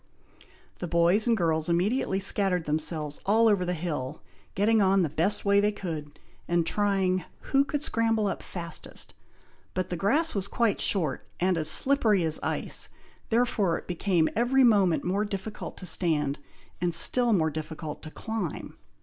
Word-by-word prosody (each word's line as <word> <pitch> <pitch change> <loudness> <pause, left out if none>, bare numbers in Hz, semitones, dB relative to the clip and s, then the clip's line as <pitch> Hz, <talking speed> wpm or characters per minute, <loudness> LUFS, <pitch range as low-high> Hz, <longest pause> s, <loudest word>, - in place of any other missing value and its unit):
The 175 - -4
boys 170 +6 +3
and 230 -1 +3
girls 160 -3 0
immediately 190 +3 0
scattered 190 -3 +1
themselves 150 -1 -2
all 225 +3 +3
over 200 -4 +3
the 180 0 -2
hill, 155 -6 -5 0.3
getting 215 +3 +3
on 195 -1 +3
the 160 - -1
best 175 +8 +1
way 200 0 +4
they 205 +1 +2
could, 155 -7 -6 0.3
and 170 -1 +1
trying 190 -2 0 0.3
who 275 0 +4
could 290 +1 -3
scramble 225 -5 +1
up 195 - -2
fastest, 170 -3 -4 0.6
but 185 0 -2
the - - -1
grass 285 - +1
was 200 -2 -2
quite 225 -1 0
short, 160 -10 -1
and 185 +1 +2
as 160 -2 0
slippery 220 - +3
as 160 -1 -1
ice, - - -2 0.4
therefore 225 -7 +1
it - - -10
became 175 -2 +1
every 255 +3 +3
moment 200 -8 +3
more 195 +4 0
difficult 205 +1 -6
to 185 - -7
stand, 150 -5 +1 0.4
and 175 -2 0
still 240 +7 +5
more 160 -6 +2
difficult 155 0 -6
to 155 - -9
climb. 220 -2 -5
185 Hz, 160 wpm, -27 LUFS, 165-210 Hz, 0.6 s, still